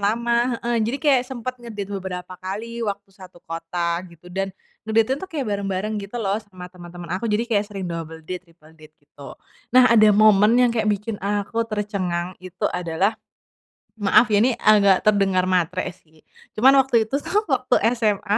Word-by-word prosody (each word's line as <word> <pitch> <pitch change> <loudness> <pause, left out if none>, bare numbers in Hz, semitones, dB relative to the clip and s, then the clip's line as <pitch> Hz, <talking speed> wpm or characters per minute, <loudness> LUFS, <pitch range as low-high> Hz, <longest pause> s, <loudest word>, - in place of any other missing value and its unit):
lama 235 +3 +1
heeh, 235 +1 -2
jadi 230 +5 -1
kayak 280 -4 +3
sempet 255 0 -5
nge-date 205 -4 -7
beberapa 185 -1 -6
kali 225 +5 -6
waktu 205 -2 -3
satu 185 -3 -15
kota 170 +1 -3
gitu 170 +1 -16
dan, 195 +1 -2 0.4
nge-date-nya 225 +5 +2
itu 380 - -6
kayak 300 -6 -3
bareng-bareng 200 +1 -2
gitu 200 +4 -8
loh 210 -1 -1
sama 185 -4 -12
temen-temen 175 -1 -9
aku 220 +5 -2
jadi 215 +2 +1
kayak 210 -4 0
sering 195 -2 -6
double 165 -2 -6
date, 180 0 -7
triple 160 -1 -21
date 155 -1 -18
gitu. 145 -1 -13 0.4
Nah 255 - +8
ada 215 -2 +6
momen 210 +2 +5
yang 245 -2 +4
kayak 225 -2 0
bikin 210 +1 -2
aku 205 +3 -2
tercengang 185 -4 -3
itu 185 0 -7
adalah, 180 +4 0 0.9
maaf 210 +3 +4
ya 205 - +4
ini 240 +2 +3
agak 200 -3 +4
terdengar 195 -3 +3
matre 180 0 0
sih 160 -3 -27 0.4
cuman 265 +5 +6
waktu 230 -4 +1
itu 270 - -3
sa - - -7 0.2
waktu 255 -3 +1 0.2
SMA 210 -3 0
205 Hz, 175 wpm, -22 LUFS, 180-230 Hz, 0.9 s, Nah